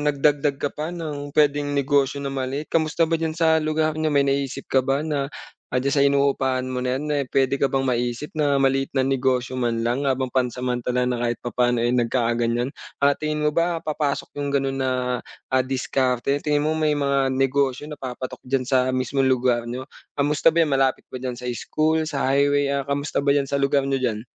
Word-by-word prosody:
nagdagdag 145 -1 +2
ka 145 - -1
pa 155 +1 -4
ng 145 -4 -6
puwedeng 145 -1 +2
negosyo 140 0 +1
na 135 - -2
maliit, 135 +3 -3
kamusta 160 0 +2
ba 165 0 0
diyan 160 -1 -1
sa 160 -1 +4
lugar 155 0 0
niyo? 155 0 +1
May 140 -1 +4
naisip 135 0 -1
ka 130 -1 +3
ba 135 +1 +1
na, 150 -3 -1 0.5
ah, 125 - +2
diyan 140 +1 0
sa 140 - +5
inuupahan 135 -2 +1
mo 125 0 -3
na 125 +1 0
'yan, 150 - -5
eh, 140 - 0
puwede 135 0 +2
ka 140 0 +1
bang 135 0 +1
maisip 120 +3 -1
na 145 -2 +2
maliit 135 0 +1
na 135 - +1
negosyo 130 -1 0
man 120 -2 0
lang 120 +5 0
habang 130 -1 0
pansamantala 125 0 -1
na 125 - 0
kahit 120 0 -1
papaano 120 0 0
ay 120 +1 +1
nagkaganiyan? 120 0 +1 0.3
Ah, 140 0 +4
tingin 155 0 -2
mo 150 - +2
ba 170 0 +2
papasok 145 -2 -2
'yong 145 0 -2
gano'n 135 -1 0
na, 130 - +1 0.6
ah, 130 -1 +2
diskarte? 130 0 0
Tingin 150 -1 +2
mo 160 - +1
may 155 -1 +2
mga 140 -2 +1
negosyo 135 +1 0
na 150 - -7
papatok 130 0 -6
diyan 130 0 -1
sa 130 -1 +3
mismong 130 +1 +1
lugar 125 -2 +2
niyo? 125 +3 -6 0.2
Kamusta 150 +3 +2
ba 170 - +2
'yan? 160 - +3
Malapit 135 -1 0
ba - - -7
diyan 125 -2 -4
sa 125 - -7
school, 160 +1 0
sa 145 -3 -3
highway, 145 0 +3
ah, 140 -1 -1
kamusta 140 0 -2
ba 140 - +4
diyan 140 -1 +1
sa 140 - 0
lugar 140 0 +2
niyo 135 - +1
diyan? 110 -4 0
135 Hz, 205 wpm, -23 LUFS, 130-145 Hz, 0.6 s, sa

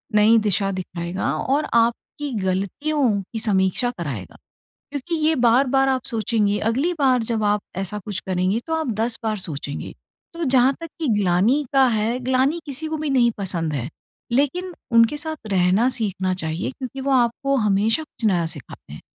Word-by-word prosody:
नई 215 +2 +6
दिशा 195 0 +1
दिखाएगा 180 -1 -3
और 280 +3 0
आपकी 235 +5 0
गलतियों 235 - 0
की 225 +4 -7
समीक्षा 205 +2 +2
कराएगा। 130 - -5 0.6
क्योंकि 285 +4 -4
ये 320 - +4
बार-बार 260 +2 +3
आप 260 -1 0
सोचेंगे 215 -3 0
अगली 260 +12 0
बार 255 -4 +3
जब 225 -1 -2
आप 205 0 +2 0.2
ऐसा 195 +2 -3
कुछ 205 -3 -4
करेंगे 185 +4 0
तो 320 - -1
आप 320 -5 -1
10 230 +1 0
बार 215 -1 -1
सोचेंगे। 145 -5 -5 0.4
तो 335 - -3
जहाँ 260 -1 +4
तक 330 - -6
कि 315 - -1
ग्लानि 205 +10 +2
का 270 -1 +5
है, 225 +1 0
ग्लानि 260 +6 +2
किसी 290 +2 -5
को 315 - -2
भी 305 -2 -2
नहीं 245 -3 +4
पसंद 170 -5 -1
है। 130 -3 -3 0.4
लेकिन 350 +8 0 0.2
उनके 230 +5 +5
साथ 315 +1 -4
रहना 190 +5 +3
सीखना 195 -7 -1
चाहिए 160 +2 -3
क्योंकि 260 0 -7
वो 275 +1 -1
आपको 255 +2 +2
हमेशा 215 +4 +2
कुछ 295 -6 -11
नया 175 -5 +2
सिखाते 145 - -9
हैं। 75 - -9
230 Hz, 170 wpm, -22 LUFS, 190-270 Hz, 0.6 s, नई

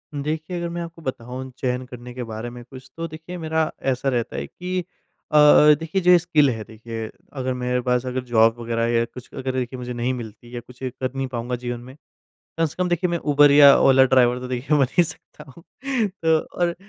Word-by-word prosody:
देखिए, 155 +5 -3
अगर 170 0 -3
मैं 175 - -3
आपको 165 0 -9
बताऊँ 130 -1 -6
चयन 125 -1 -2
करने 125 -1 -10
के 125 0 -5
बारे 115 +1 -6
में 120 0 -10
कुछ 130 +2 -13
तो 165 0 -3
देखिए 160 +3 -9
मेरा 160 -1 -1 0.2
ऐसा 130 +2 -1
रहता 120 -2 -2
है - - -3
कि 185 +1 -4 0.5
अ - - -1
अ, 150 0 +8
देखिए 165 +4 -2
जो 180 0 +5
ये 180 - +7
स्किल 155 -5 +3
है 110 -3 -3
देखिए, 110 +1 -7 0.2
अगर 130 -2 -2
मेरे 125 0 -1
पास 125 0 0
अगर 130 0 -3
जॉब 115 -2 +4
वगैरह 115 0 -1
या 115 0 +2
कुछ 125 +1 -12
अगर 130 0 -3
देखिए 130 0 -3
मुझे 125 0 -5
नहीं 120 +2 -1
मिलती 120 0 -9
या 120 - -3
कुछ 125 +1 -17
कर 130 0 -4
नहीं 135 0 -2
पाऊँगा 125 0 -3
जीवन 120 0 -5
में, 130 +2 -12 0.6
कम 165 - +3
से 150 - -9
कम 180 - 0
देखिए 175 +1 0
मैं 170 - 0
उबर 145 -1 +4
या 140 -1 +8
ओला 130 0 +6
ड्राइवर 125 -1 +3
तो 125 - -6
देखिए 130 +4 0
बन - - +4
नहीं 175 - +4
सकता 150 -1 -11
हूँ। 165 +5 -16 0.5
तो 165 -4 +1
और, 170 +2 -2
130 Hz, 225 wpm, -22 LUFS, 120-155 Hz, 0.6 s, अ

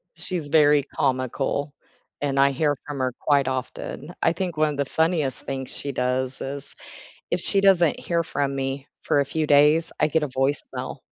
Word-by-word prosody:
She's 175 -3 -3
very 150 -2 +5
comical, 135 +2 -2 0.5
and 140 -1 -1
I 140 0 +5
hear 145 +1 +1
from 145 -2 -6
her 130 -1 -1
quite 140 -3 +2
often. 130 +4 -5
I 165 - +3
think 175 -2 -4
1 155 0 +3
of 145 - -5
the 140 - 0
funniest 160 -2 0
things 135 -1 -2
she 140 - -2
does 125 0 -1
is, 140 +1 -6 0.6
if 175 - 0
she 195 - +4
doesn't 185 -5 +4
hear 170 -1 0
from 140 -3 -2
me 135 0 -3 0.2
for 145 - +2
a - - +1
few 155 +3 -2
days, 150 +3 +4
I - - +4
get 160 0 +1
a 150 - -3
voicemail, 135 +2 -2
145 Hz, 185 wpm, -24 LUFS, 135-160 Hz, 0.6 s, very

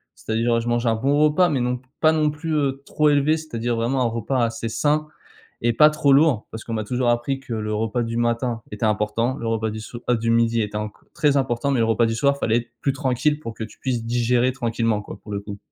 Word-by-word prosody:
c'est-à-dire 115 +1 0
je 120 - -3
mange 120 0 0
un 115 - +3
bon 140 +6 +1
repas 155 +4 +4
mais 140 -5 0
non 125 0 -1 0.2
pas 155 0 +4
non 155 -1 +2
plus, 155 +2 -4
heu, 140 -2 0
trop 150 0 +2
élevé, 145 +2 +3
c'est-à-dire 120 -7 -3
vraiment 120 +4 0
un - - +2
repas 115 +3 -1
assez 115 0 -1
sain 150 +7 +1 0.6
et 120 0 +2
pas 150 +6 +6
trop 150 -2 +2
lourd 140 -5 +4
parce 110 - -6
qu'on 115 - -7
m'a 110 -1 -2
toujours 125 +3 -1
appris 120 +3 0
que 135 - -9
le 110 -1 -2
repas 115 +3 -1
du 115 0 -4
matin 120 0 0
était 105 +2 -4
important, 110 +4 0
le 115 - -3
repas 110 -1 -1
du 110 +1 -6
soi, 120 +2 -8
heu, 120 - +4
du 115 0 -1
midi 115 0 +2
était 105 0 -4
enco 105 0 -6
très 145 -2 +2
important 130 0 0
mais 130 - +1
le - - +4
repas 115 +1 +2
du 115 - -1
soir, 140 +4 +2
fallait 115 -3 +2
être 120 0 -7
plus 140 - +1
tranquille 135 +2 0
pour 115 -6 -7
que 110 - -5
tu 110 - -13
puisses 125 -3 -2
digérer 120 +2 +1
tranquillement, 115 -4 -1
quoi, 100 - -9
pour 105 - -10
le 100 - -2
coup 100 0 -8
120 Hz, 250 wpm, -22 LUFS, 115-135 Hz, 0.6 s, pas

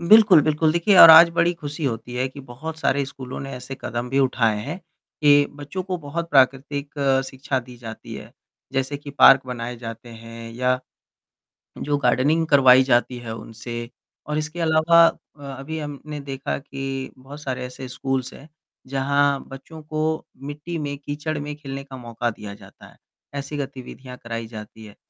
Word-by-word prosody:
बिल्कुल, 200 -1 +7
बिल्कुल। 155 +1 +2
देखिए 170 +4 +3
और 165 - +12
आज 165 +2 +10
बड़ी 170 +1 +2
खुशी 150 -1 -6
होती 120 -1 -3
है 125 +1 0
कि 140 - -11
बहुत 140 +5 -8
सारे 140 -2 +1
स्कूलों 130 -2 -8
ने 135 - -6
ऐसे 125 +2 -7
कदम 120 0 -4
भी 135 - +1
उठाए 120 -5 +2
हैं 165 +6 -5 0.4
कि 145 -1 +6
बच्चों 145 +6 -5
को 185 0 -3
बहुत 165 +2 -5
प्राकृतिक 140 +1 +2 0.4
शिक्षा 130 0 -2
दी 125 +1 -13
जाती 115 -2 -9
है। - - -10 0.4
जैसे 135 +1 -1
कि 140 0 -10
पार्क 135 -1 +7
बनाए 120 -1 -5
जाते 115 0 -8
हैं 115 0 -10
या 125 +1 +1 1.0
जो 145 0 -1
गार्डनिंग 140 +5 +2
करवाई 130 -3 +7
जाती 125 -1 +1
है 115 -2 -6
उनसे। 115 +2 -7 0.4
और 150 0 -2
इसके 155 +3 -4
अलावा 165 +1 +5
अ, 150 - -7 0.2
अभी 155 +4 -5
हमने 150 0 -7
देखा 135 -1 -4
कि 135 -1 -5
बहुत 140 +3 -11
सारे 130 -3 -4
ऐसे 125 +1 -8
स्कूल्स 130 0 -3
हैं 145 - -13 0.4
जहाँ 140 +1 +1
बच्चों 145 +4 -11
को 155 +1 -2 0.2
मिट्टी 150 +4 -6
में, 145 -2 -4
कीचड़ 150 +2 -4
में 145 0 -5
खेलने 135 -2 -7
का 135 -1 -10
मौका 120 -1 -3
दिया 105 -2 -8
जाता - - -16
है, - - -20 0.4
ऐसी 140 +1 -5
गतिविधियाँ 130 -2 -7
कराई 115 -1 -5
जाती 110 0 -10
हैं। 105 - -14
135 Hz, 170 wpm, -23 LUFS, 125-150 Hz, 1.0 s, और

